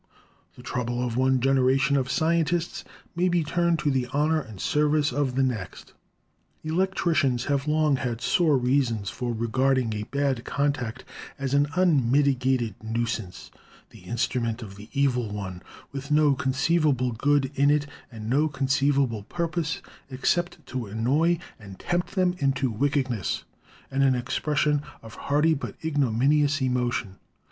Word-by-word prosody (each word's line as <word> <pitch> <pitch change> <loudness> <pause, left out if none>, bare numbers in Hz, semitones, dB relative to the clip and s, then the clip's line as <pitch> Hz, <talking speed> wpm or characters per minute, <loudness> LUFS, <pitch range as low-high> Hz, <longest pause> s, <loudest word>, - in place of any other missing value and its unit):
The - - -13
trouble 120 0 -2
of 120 -2 -3
one 130 +1 +3
generation 135 +2 +3
of 130 -2 0
scientists 170 +6 0 0.3
may 180 +2 +2
be 175 -2 +2
turned 170 +2 +1
to 145 - +3
the 130 -2 0
honor 150 +4 +1
and 110 -8 -11
service 150 -1 +2
of 135 -2 0
the 135 - +2
next. 110 -9 -4 0.7
Electricians 160 -7 +1
have 140 0 -1
long 150 -2 +2
had 120 -3 -3
sore 150 +4 +3
reasons 125 -5 0
for 125 -1 -3
regarding 120 +1 +1
a 105 - -3
'bad 135 +1 -1
contact' 130 -3 -2 0.3
as 135 -1 -3
an 145 +1 +3
unmitigated 130 - +2
nuisance, 115 -4 -4 0.4
the - - -14
instrument 120 0 -2
of 100 -3 -10
the 105 +3 -12
evil 130 -5 +1
one, 95 -3 -6 0.3
with 140 +1 -6
no 150 -1 +4
con 135 -1 -1
ceivable 135 -4 +1
good 140 +2 +1
in 140 +1 +3
it, 145 0 +2 0.3
and 110 -2 -8
no 145 +6 +2
conceivable 140 -4 +1
purpose 170 - -3 0.3
except 175 +7 -1
to 125 -4 -5
annoy 135 +11 +1 0.2
and 100 -3 -11
tempt 175 0 -2
them 185 -2 +2
into 135 -2 +1
wickedness 130 - -1 0.5
and 135 +1 0
an 135 -1 +4
ex 125 +1 -2
pression 150 -1 +1 0.2
of 110 - -11
hearty 150 +3 +1
but 145 - -5
ignominious 145 +1 +2
emotion. 125 -6 -1
135 Hz, 145 wpm, -26 LUFS, 120-150 Hz, 0.7 s, no